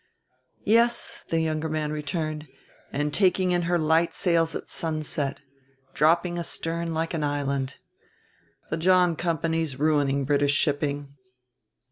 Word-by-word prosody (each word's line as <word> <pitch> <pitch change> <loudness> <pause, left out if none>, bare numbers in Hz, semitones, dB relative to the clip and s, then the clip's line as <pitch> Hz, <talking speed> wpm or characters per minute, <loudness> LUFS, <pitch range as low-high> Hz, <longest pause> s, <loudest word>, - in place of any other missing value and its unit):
"Yes," 235 +2 +2
the 165 - +1
younger 160 0 -1
man 155 -1 -2
returned, 155 0 -3 0.4
"and 145 +1 -2
taking 185 -1 +3
in 175 0 +2
her 175 - +3
light 160 +1 +2
sails 165 -2 +2
at - - -5
sunset, 155 -4 -2 0.5
dropping 170 +3 +2
astern 165 0 -3
like 165 +1 -2
an 160 -2 -1
island. 140 -2 -1 1.0
The 155 - 0
John 180 0 +4
Company's 165 -3 -1
ruining 140 -2 +1
British 145 0 +2
shipping." 145 -1 -1
155 Hz, 120 wpm, -26 LUFS, 145-170 Hz, 1.0 s, John